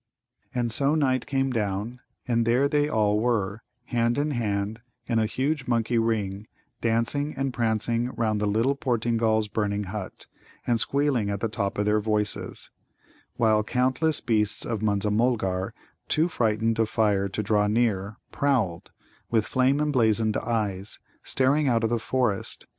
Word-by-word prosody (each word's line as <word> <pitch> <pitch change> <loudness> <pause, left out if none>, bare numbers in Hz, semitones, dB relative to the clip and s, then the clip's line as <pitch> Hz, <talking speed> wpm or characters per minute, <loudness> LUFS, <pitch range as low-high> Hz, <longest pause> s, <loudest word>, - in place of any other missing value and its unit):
And 120 -2 0
so 140 +5 +3
Night 130 -5 +1
came 135 -1 0
down, 105 +1 -2 0.3
and 115 -1 +2
there 120 +5 +3
they 145 0 +1
all 105 -5 +2
were, 110 -3 0 0.2
hand 120 0 0
in 150 +1 0
hand 105 -3 -2 0.3
in 115 -2 +1
a 110 - +2
huge 135 +4 -2
monkey 115 -1 +1
ring, 105 -3 -1 0.3
dancing 120 +6 0
and 135 -1 -1
prancing 115 +1 0
round 110 -2 0
the 105 - +1
little 115 +7 +2
Portingal's 115 -4 +1
burning 105 -1 -1
hut, 100 0 -7 0.4
and 120 -1 +2
squealing 135 -4 +1
at 100 -1 -2
the 115 - 0
top 100 -3 -2
of 105 - 0
their 105 +1 +3
voices; 105 -1 -2 0.6
while 110 -2 +3
countless 130 +7 0
beasts 110 -3 +1
of 110 -3 -3
Munza 105 -1 +1
mulgar, 105 -5 0 0.4
too 160 +2 +2
frightened 115 -6 0
of 110 -1 +2
fire 100 -3 +1
to 105 - -3
draw 105 0 +2
near, 105 -2 0
prowled, 125 - 0 0.4
with 110 -3 +2
flame 130 +2 +2
emblazoned 115 -7 +2
eyes, 105 -4 -2 0.2
staring 140 +3 +2
out 115 -3 +2
of 115 - +1
the 120 - +1
forest. 120 -3 -1
115 Hz, 155 wpm, -26 LUFS, 105-125 Hz, 0.6 s, so